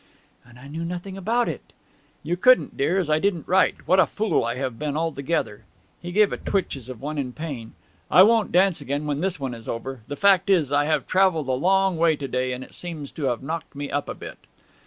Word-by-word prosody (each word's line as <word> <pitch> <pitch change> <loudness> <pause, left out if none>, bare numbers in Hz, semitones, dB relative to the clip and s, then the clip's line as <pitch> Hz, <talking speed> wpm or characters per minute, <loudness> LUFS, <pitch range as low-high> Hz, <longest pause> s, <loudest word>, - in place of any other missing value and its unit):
'And 120 -1 -18
I 135 +3 -12
knew 160 +4 -5
nothing 180 +3 -5
about 230 +6 0
it!' - - -6 0.5
'You 175 - -1
couldn't, 250 +8 +4
dear, 165 +7 +1
as 185 -5 0
I 155 0 +2
didn't 175 -4 -1
write. 185 +1 +2
What 185 +1 +4
a - - +5
fool 215 0 0
I 120 +1 -2
have 125 -3 -4
been 150 -1 -2
altogether!' 155 -8 -2 0.4
He 175 - -6
gave 210 +2 +3
a - - -3
twitch, 195 -6 -1
as 130 -2 -10
of 125 -4 -8
one 150 +1 -3
in 125 -3 -3
pain. 140 -8 -7 0.4
'I 185 - +8
won't 225 0 +3
dance 185 -2 +3
again 140 +2 -3
when 145 -1 -2
this 185 -2 -1
one 135 -3 -3
is 115 -1 -9
over. 130 +2 -5
The 145 - -5
fact 200 +2 +4
is 165 -8 +3
I 145 0 +3
have 155 - 0
travelled 185 -7 +2
a - - +2
long 190 +6 +2
way 165 -1 +3
to 140 -1 -5
day, 130 0 -1
and 125 +1 -5
it - - -15
seems 160 -5 -6
to 150 - -4
have 125 -1 -1
knocked 160 +1 -5
me 145 0 -5
up 145 - -2
a - - -4
bit.' - - -10
155 Hz, 240 wpm, -24 LUFS, 135-185 Hz, 0.5 s, I